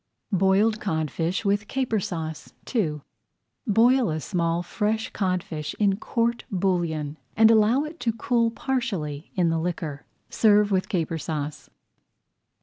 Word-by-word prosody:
BOILED 195 +4 +3
CODFISH 165 - -1
WITH 205 +1 +1
CAPER 255 -5 0
SAUCE 160 -4 -5 0.2
II 155 - 0 0.7
Boil 235 +2 +4
a 155 0 -1
small 170 -1 -1
fresh 215 +4 -1
codfish 180 -6 -2
in 200 -2 +2
court 235 +2 -1
bouillon, 170 -6 -1 0.2
and 225 0 +7
allow 225 +5 +4
it 310 +2 -8
to 230 - +1
cool 230 0 +1
partially 200 - -3
in 175 -3 +2
the 165 0 +1
liquor. 160 -4 -4 0.2
Serve 210 -1 +4
with 190 -1 +1
Caper 165 -3 -1
Sauce. 150 -1 -4
190 Hz, 130 wpm, -25 LUFS, 165-225 Hz, 0.7 s, and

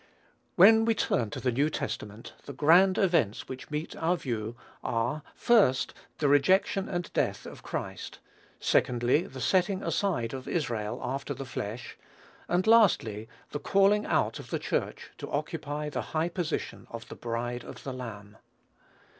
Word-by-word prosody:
When 220 +5 +7
we 230 -1 +2
turn 120 - 0
to - - -6
the 125 - 0
New 140 +6 +2
Testament, 105 -6 -5
the 140 - -7
grand 175 +7 +5
events 165 - +1
which 130 0 -8
meet 150 +1 -4
our 170 +2 +1
view 115 -5 -4 0.3
are, 120 +6 -1
first, 200 - +3 0.2
the 150 - +1
rejection 185 +7 +3
and 175 -2 -4
death - - -1
of - - -10
Christ; - - -5 0.4
secondly, 125 +6 +2
the 130 - -9
setting 190 +6 +1
aside 155 - -1
of 130 -1 -6
Israel 115 -10 -2
after 135 +2 -3
the 135 - -6
flesh; 120 -1 -6 0.5
and, 180 +2 +1
lastly, 145 - +4 0.2
the 145 - -3
calling 200 +4 +3
out - - +1
of - - -10
the - - -1
Church - - -3
to - - -6
occupy 150 +1 -3
the 150 - -3 0.2
high 165 +2 +1
position 175 -2 -4
of 115 -1 -8
the - - -9
bride 120 +1 -3
of - - -10
the 135 - -5
Lamb. 110 -5 -8
145 Hz, 155 wpm, -29 LUFS, 120-180 Hz, 0.5 s, When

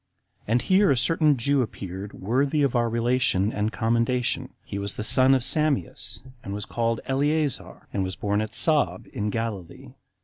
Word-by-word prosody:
And 120 +3 +1
here 190 0 +4
a 135 - +3
certain 150 +2 +2
Jew 140 +3 +2
appeared 100 -3 -6
worthy 135 +8 0
of 135 -3 +1
our 120 -1 +2
relation 115 -3 +1
and 105 +2 -1
commendation; 115 +2 0
he 100 - -5
was 100 0 -3
the - - -4
son 130 +4 +5
of 130 - 0
Sameas, 155 0 +1 0.2
and 100 - -5
was 105 - -5
called 115 -1 -1
Eleazar, 145 +1 -1
and 100 - 0
was 95 0 -4
born 105 0 -1
at 110 +2 -5
Saab, 125 - +1
in 105 0 -4
Galilee. 105 -6 -5
115 Hz, 170 wpm, -25 LUFS, 105-135 Hz, 0.2 s, son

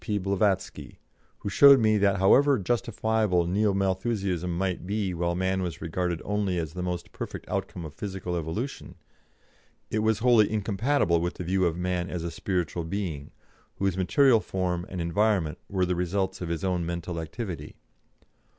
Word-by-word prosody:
P. 105 -3 -1
Blavatsky, 100 0 -1 0.4
who - - -3
showed 140 +6 +8
me 110 -2 +3
that 100 -1 +3
however 135 +9 +5
justifiable 110 -4 0
Neo 100 +4 +2
Malthusianism 95 -2 -1
might 95 -1 -2
be 100 -2 -1
while 85 0 -1
man 95 +1 0
was 85 -3 -4
regarded 85 0 -2
only 100 -3 0
as 80 -3 -3
the 90 - -5
most 90 -1 -4
perfect - - -7
outcome 85 -3 -4
of 75 - -8
physical 95 -1 -4
evolution, 85 - -4 1.0
it 110 - 0
was 110 0 +2
wholly 115 -2 +4
incompatible 105 - +1
with 90 +1 -2
the - - -5
view 95 +2 +1
of 85 -1 0
man 90 0 -1
as 85 -2 -4
a 85 - -3
spiritual 90 -3 -2
being, 80 -6 -4 0.5
whose 95 -2 0
material 115 +7 +4
form 90 -3 -2
and 90 -2 -4
environment 85 -2 +1
were 95 -2 +1
the 90 - 0
results 95 +2 -1
of 85 - -4
his 85 -2 -3
own 90 -2 0
mental 85 0 -4
activity. 85 +3 -6
95 Hz, 165 wpm, -27 LUFS, 85-105 Hz, 1.0 s, showed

